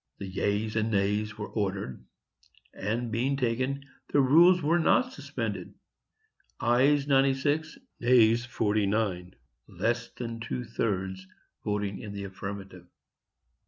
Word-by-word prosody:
The -, -, -6 dB
yeas 100 Hz, +3 st, -1 dB
and 110 Hz, 0 st, +1 dB
nays 105 Hz, +1 st, 0 dB
were 105 Hz, -, -5 dB
ordered, 100 Hz, -, -3 dB, 0.7 s
and, 115 Hz, +3 st, -2 dB
being 130 Hz, +5 st, 0 dB
taken, 130 Hz, +2 st, -1 dB, 0.3 s
the 145 Hz, -, +4 dB
rules 170 Hz, +7 st, +6 dB
were 165 Hz, +4 st, +3 dB
not 255 Hz, +9 st, +3 dB
suspended,—ayes 145 Hz, -, -2 dB
96, 140 Hz, +3 st, +2 dB, 0.2 s
nays 120 Hz, -1 st, +4 dB
49,—less 100 Hz, -, -2 dB
than 115 Hz, -2 st, -5 dB
two 115 Hz, +2 st, -4 dB
thirds 95 Hz, -4 st, -2 dB, 0.4 s
voting 105 Hz, -1 st, -2 dB
in 105 Hz, -2 st, -7 dB
the 100 Hz, 0 st, -5 dB
affirmative. 95 Hz, -1 st, -7 dB
115 Hz, 105 wpm, -28 LUFS, 100-130 Hz, 0.7 s, rules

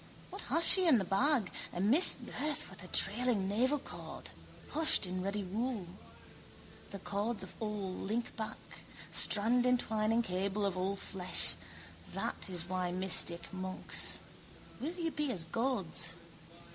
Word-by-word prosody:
What -, -, -6 dB
has 335 Hz, -, +2 dB
she 375 Hz, -2 st, +9 dB
in 290 Hz, -7 st, +6 dB
the 195 Hz, -, -2 dB
bag? 230 Hz, -, +1 dB, 0.2 s
A -, -, -6 dB
misbirth 290 Hz, -, +2 dB
with 190 Hz, -, -12 dB
a -, -, -10 dB
trailing 210 Hz, +1 st, 0 dB
navelcord, 255 Hz, +8 st, -3 dB, 0.4 s
hushed 315 Hz, -8 st, +4 dB
in 185 Hz, 0 st, -4 dB
ruddy 200 Hz, +2 st, -3 dB
wool. 215 Hz, +2 st, -3 dB, 1.0 s
The 200 Hz, -, -7 dB
cords 205 Hz, +4 st, -3 dB
of -, -, -10 dB
all 210 Hz, -3 st, -4 dB
link 225 Hz, +5 st, -4 dB
back, 220 Hz, -1 st, -5 dB, 0.6 s
strandentwining 225 Hz, 0 st, +2 dB
cable 195 Hz, +2 st, -2 dB
of 195 Hz, -2 st, -2 dB
all 190 Hz, +2 st, -2 dB
flesh. 185 Hz, -2 st, +3 dB, 0.6 s
That -, -, -3 dB
is 175 Hz, -2 st, -3 dB
why 180 Hz, -1 st, -2 dB
mystic 180 Hz, -1 st, +1 dB
monks. 185 Hz, 0 st, +1 dB, 0.6 s
Will 320 Hz, +6 st, -4 dB
you 335 Hz, -2 st, -3 dB
be 300 Hz, -3 st, -2 dB
as 180 Hz, -8 st, -2 dB
gods? 185 Hz, -5 st, 0 dB
205 Hz, 135 wpm, -32 LUFS, 185-250 Hz, 1.0 s, she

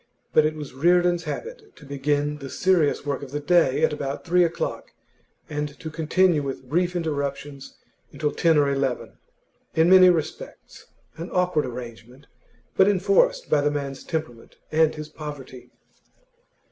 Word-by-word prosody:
But 155 Hz, 0 st, +5 dB
it 155 Hz, -, -4 dB
was 150 Hz, -4 st, -8 dB
Reardon's 175 Hz, +4 st, +2 dB
habit 460 Hz, -4 st, -7 dB
to -, -, -15 dB
begin 145 Hz, +1 st, -1 dB
the 135 Hz, -1 st, -8 dB
serious 175 Hz, -5 st, +1 dB
work 140 Hz, -2 st, -2 dB
of 140 Hz, -, -8 dB
the 145 Hz, +2 st, -3 dB
day 165 Hz, -3 st, +2 dB
at -, -, +3 dB
about 140 Hz, -1 st, -5 dB
three 180 Hz, 0 st, +4 dB
o'clock, 170 Hz, -1 st, -3 dB, 0.5 s
and 150 Hz, -1 st, -5 dB
to 160 Hz, -, -7 dB
continue 165 Hz, +1 st, +2 dB
with 135 Hz, -2 st, -6 dB
brief 175 Hz, +5 st, 0 dB
interruptions 140 Hz, -4 st, -4 dB, 0.3 s
until 150 Hz, -1 st, -2 dB
ten 165 Hz, +1 st, +2 dB
or 145 Hz, -1 st, +4 dB
eleven; 135 Hz, -2 st, -2 dB, 0.6 s
in 160 Hz, +3 st, +4 dB
many 185 Hz, -1 st, +8 dB
respects 165 Hz, -4 st, -4 dB, 0.3 s
an 170 Hz, +2 st, -6 dB
awkward 180 Hz, -6 st, 0 dB
arrangement, 120 Hz, +1 st, -10 dB, 0.5 s
but 190 Hz, -, +5 dB
enforced 205 Hz, -, +2 dB
by 145 Hz, -, +2 dB
the 145 Hz, -, +2 dB
man's 140 Hz, -2 st, -4 dB
temperament 155 Hz, -8 st, -5 dB, 0.2 s
and 155 Hz, 0 st, +3 dB
his 155 Hz, 0 st, -7 dB
poverty. 145 Hz, -5 st, -9 dB
150 Hz, 150 wpm, -24 LUFS, 140-175 Hz, 0.6 s, many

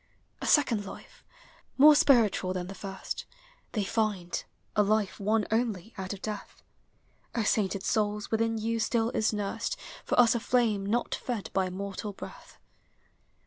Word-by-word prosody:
A -, -, -3 dB
second 240 Hz, -8 st, +4 dB
life, -, -, -11 dB, 0.5 s
more 300 Hz, +3 st, +9 dB
spiritual 225 Hz, -10 st, +4 dB
than 180 Hz, -1 st, -3 dB
the 190 Hz, -, -7 dB
first, 195 Hz, -1 st, -6 dB, 0.5 s
They 210 Hz, -, 0 dB
find, 200 Hz, -4 st, -1 dB, 0.2 s
— -, -, -41 dB
a 210 Hz, -, +5 dB
life 210 Hz, -1 st, +1 dB
won 210 Hz, +2 st, +1 dB
only 220 Hz, -2 st, -1 dB
out 190 Hz, -3 st, -5 dB
of 200 Hz, -2 st, -7 dB
death. 210 Hz, -2 st, -6 dB, 0.7 s
O 230 Hz, -, +1 dB
sainted 200 Hz, -2 st, +1 dB
souls, 210 Hz, -1 st, 0 dB
within 225 Hz, 0 st, +1 dB
you 225 Hz, +1 st, -1 dB
still 225 Hz, +1 st, +1 dB
is 220 Hz, -, +1 dB
nursed 205 Hz, -2 st, -2 dB, 0.3 s
For -, -, 0 dB
us 240 Hz, -2 st, +7 dB
a 235 Hz, -, -1 dB, 0.2 s
(lame 210 Hz, -5 st, +1 dB
not 235 Hz, +4 st, 0 dB
fed 235 Hz, -6 st, -4 dB
by 190 Hz, -1 st, +1 dB
mortal 200 Hz, +2 st, -5 dB
breath. -, -, -11 dB
210 Hz, 155 wpm, -29 LUFS, 195-225 Hz, 0.7 s, more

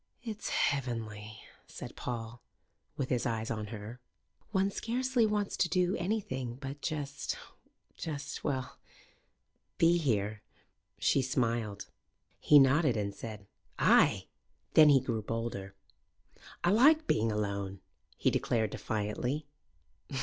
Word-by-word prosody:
"It's 220 Hz, -3 st, -5 dB
heavenly," 110 Hz, -6 st, -2 dB, 0.3 s
said -, -, -9 dB
Paul, 120 Hz, 0 st, -5 dB, 0.6 s
with 130 Hz, -, -2 dB
his 125 Hz, -1 st, +1 dB
eyes 115 Hz, -1 st, -2 dB
on 110 Hz, -2 st, -3 dB
her. 110 Hz, +3 st, -8 dB, 0.5 s
"One 195 Hz, -1 st, +1 dB
scarcely 245 Hz, +1 st, +1 dB
wants 210 Hz, -1 st, -1 dB
to 175 Hz, -, +2 dB
do 180 Hz, +2 st, +2 dB
anything 130 Hz, -, -2 dB
but 135 Hz, +2 st, -7 dB
just 145 Hz, -2 st, -3 dB, 0.6 s
just 150 Hz, -3 st, -5 dB
well, 135 Hz, 0 st, -3 dB, 1.0 s
be 170 Hz, +1 st, +5 dB
here." 105 Hz, -7 st, 0 dB, 0.6 s
She 135 Hz, -, +3 dB
smiled. 115 Hz, -5 st, -1 dB, 0.5 s
He 150 Hz, -, +6 dB
nodded 135 Hz, -2 st, +5 dB
and 100 Hz, -1 st, -2 dB
said, 105 Hz, -2 st, -8 dB, 0.3 s
"Ay!" -, -, +4 dB, 0.5 s
Then 155 Hz, -1 st, +8 dB
he 140 Hz, -2 st, +7 dB
grew 120 Hz, -4 st, -2 dB
bolder. 110 Hz, -3 st, -4 dB, 0.9 s
"I 175 Hz, -, +4 dB
like 300 Hz, +9 st, +6 dB
being 110 Hz, -, +2 dB
alone," 100 Hz, -2 st, -2 dB, 0.4 s
he -, -, +2 dB
declared 110 Hz, -3 st, 0 dB
defiantly. 115 Hz, +7 st, -2 dB
125 Hz, 115 wpm, -31 LUFS, 110-160 Hz, 1.0 s, Then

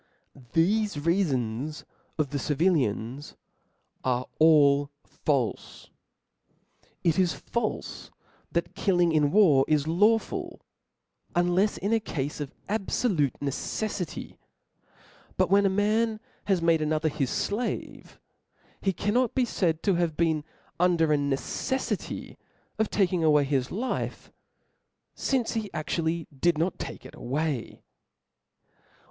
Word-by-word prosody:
Thefe 170 Hz, -, +1 dB
reafons 145 Hz, -, -1 dB, 0.3 s
of 150 Hz, -4 st, 0 dB
the 145 Hz, -, -1 dB
civilians 140 Hz, -, 0 dB, 0.7 s
are 125 Hz, -1 st, 0 dB
all 145 Hz, -3 st, +5 dB, 0.2 s
falfe. 135 Hz, -6 st, -2 dB, 1.1 s
It 170 Hz, +1 st, +2 dB
is 180 Hz, -2 st, +3 dB
falfe 235 Hz, -3 st, -4 dB, 0.4 s
that 170 Hz, 0 st, -1 dB
killing 175 Hz, -3 st, +2 dB
in 150 Hz, -2 st, +3 dB
war 160 Hz, -8 st, +5 dB
is 150 Hz, -1 st, +2 dB
lawful, 210 Hz, +7 st, +1 dB, 0.7 s
unlefs 175 Hz, +4 st, +2 dB
in 200 Hz, +4 st, -1 dB
a 225 Hz, -, +4 dB
cafe 150 Hz, -7 st, -3 dB
of 135 Hz, -, -10 dB, 0.2 s
abfolute 195 Hz, -, 0 dB
neceffity: 180 Hz, +6 st, -3 dB, 1.0 s
but -, -, +2 dB
when 200 Hz, 0 st, +5 dB
a -, -, +2 dB
man 215 Hz, +3 st, +1 dB, 0.3 s
has 190 Hz, -4 st, +1 dB
made 165 Hz, -1 st, +3 dB
another 155 Hz, +1 st, +1 dB
hisr 140 Hz, -3 st, -1 dB
flavc, 230 Hz, +4 st, -4 dB, 0.6 s
he 195 Hz, -, +1 dB
cannot 225 Hz, +7 st, 0 dB
be 255 Hz, -, +3 dB
faid 165 Hz, -8 st, 0 dB
to 200 Hz, -, +3 dB
have 170 Hz, -3 st, 0 dB
been 160 Hz, -3 st, +1 dB, 0.4 s
under 170 Hz, -3 st, +3 dB
a -, -, +5 dB
neceffity 145 Hz, -, -2 dB, 0.4 s
of 220 Hz, -, +1 dB
taking 180 Hz, -4 st, +1 dB
away 150 Hz, -2 st, +5 dB
his 135 Hz, -2 st, 0 dB
life, 245 Hz, +7 st, -3 dB, 0.8 s
fincc 255 Hz, -4 st, 0 dB
he 210 Hz, -, -8 dB
adually 160 Hz, +1 st, -1 dB
did 170 Hz, +4 st, +2 dB
hot 170 Hz, +3 st, -1 dB
take -, -, -7 dB
it -, -, -11 dB
away. 140 Hz, -1 st, -3 dB
165 Hz, 115 wpm, -27 LUFS, 145-200 Hz, 1.1 s, all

